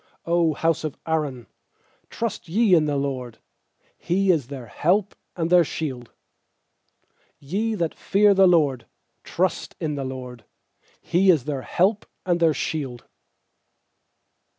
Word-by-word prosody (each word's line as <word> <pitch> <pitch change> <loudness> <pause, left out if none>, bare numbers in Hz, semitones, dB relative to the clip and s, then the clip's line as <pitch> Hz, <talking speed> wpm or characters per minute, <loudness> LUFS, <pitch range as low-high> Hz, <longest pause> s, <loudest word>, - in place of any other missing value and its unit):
100 170 -1 +2
house 165 -1 +1
of 155 -3 -4
Aaron, 150 -7 -2 0.6
trust 220 -6 -4
ye 210 +2 +3
in 160 -3 +5
the 145 -1 -1
LORD! 130 -4 -4 0.6
He 190 +2 +2
is 150 -8 0
their 135 -3 -8
help 185 - 0 0.2
and 165 -1 -2
their 180 -1 +7
shield! 130 -6 -5 1.3
nYe 205 +10 -2
that 170 -3 -1
fear 205 +1 +3
the 190 -1 +5
LORD, 145 -9 +2 0.4
trust 185 +1 -2
in 155 -3 -2
the 140 -1 -3
LORD! 130 -2 -7 0.6
He 190 +3 +2
is 160 -8 +5
their 140 -3 -3
help 195 - 0 0.2
and 175 -2 +1
their 165 -2 +3
shield. 135 -7 -4
160 Hz, 130 wpm, -23 LUFS, 135-180 Hz, 1.3 s, their